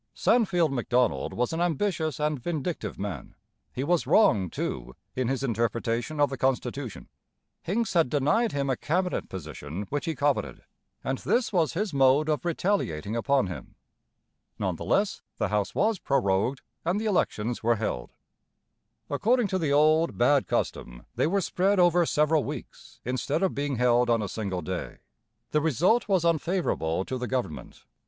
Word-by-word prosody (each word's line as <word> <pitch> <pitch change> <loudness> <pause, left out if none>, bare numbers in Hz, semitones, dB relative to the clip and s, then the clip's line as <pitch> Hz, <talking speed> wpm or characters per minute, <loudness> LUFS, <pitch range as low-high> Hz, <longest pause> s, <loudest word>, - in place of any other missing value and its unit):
Sandfield 180 - +2
Macdonald 125 -1 +1
was 125 +5 -1
an 165 - -1
ambitious 165 -3 0
and 150 -1 0
vindictive 155 - -3
man. 95 -9 -6 0.4
He 130 - -3
was 170 +3 +1
wrong, 105 - +4
too, 60 -5 -4 0.2
in 130 -2 0
his 135 +1 -1
interpretation 115 +3 -1
of 145 -2 +3
the 135 - -5
constitution. 130 -1 -2 0.5
Hincks 220 +6 -1
had 165 -7 +3
denied 150 - +2
him 140 -1 -1
a - - +1
cabinet 180 +7 -1
position 80 +1 -6
which 145 +2 -2
he 165 -2 -2
coveted, 145 0 -1 0.4
and 130 0 -2
this 235 -3 0
was 165 -4 +2
his 195 0 -2
mode 135 +3 +4
of 150 - 0
retaliating 165 - -1
upon 130 0 +2
him. 85 -8 -8 0.8
None - - -1
the - - -7
less, - - +1 0.2
the - - 0
House 105 -1 -1
was 215 -1 +1
prorogued, 125 -1 0 0.2
and 175 +5 0
the 220 - -3
elections 120 - 0
were 115 +1 +3
held. 105 - -3 1.0
According 225 - +1
to 190 - 0
the 155 -4 0
old, 155 +3 +3
bad 135 +3 +3
custom, - - -3
they - - +1
were 195 +4 +1
spread 190 +2 +1
over 175 -1 +4
several 150 0 +2
weeks, - - -8
instead 125 +8 -1
of 190 - +1
being 140 -1 -2
held 120 0 +3
on 115 -2 +2
a - - -2
single 95 -4 -4
day. 95 -1 -5 0.5
The 150 - +2
result 170 - +2
was 190 -4 +2
unfavourable 160 - 0
to 130 - -4
the 125 - -3
government. 125 - -4
140 Hz, 160 wpm, -27 LUFS, 115-170 Hz, 1.0 s, wrong